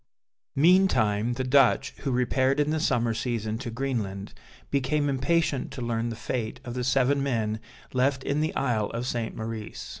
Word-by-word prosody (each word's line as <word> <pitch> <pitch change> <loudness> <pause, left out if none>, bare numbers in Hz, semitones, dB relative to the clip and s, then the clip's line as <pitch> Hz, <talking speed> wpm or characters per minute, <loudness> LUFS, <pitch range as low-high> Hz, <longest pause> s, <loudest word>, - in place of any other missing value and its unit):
Meantime 135 - +4
the 130 +2 -2
Dutch, 135 +1 +4
who 140 - -3
repaired 130 +2 +2
in 150 +1 +2
the 160 - 0
summer 120 -7 +1
season 110 -1 -2
to 130 -2 -5
Greenland, 115 -6 -3 0.4
became 140 +2 +1
impatient 140 +1 +1
to 125 - -7
learn 115 0 -1
the 115 - -4
fate 115 0 -3
of 120 - -5
the 125 0 -2
seven 135 +2 +2
men 110 -5 -1 0.3
left 130 +1 +1
in 145 +2 0
the 155 - -1
Isle 115 -6 0
of 120 +1 -2
St. 120 -3 -2
Maurice. 110 -1 -6
125 Hz, 170 wpm, -27 LUFS, 115-140 Hz, 0.4 s, Meantime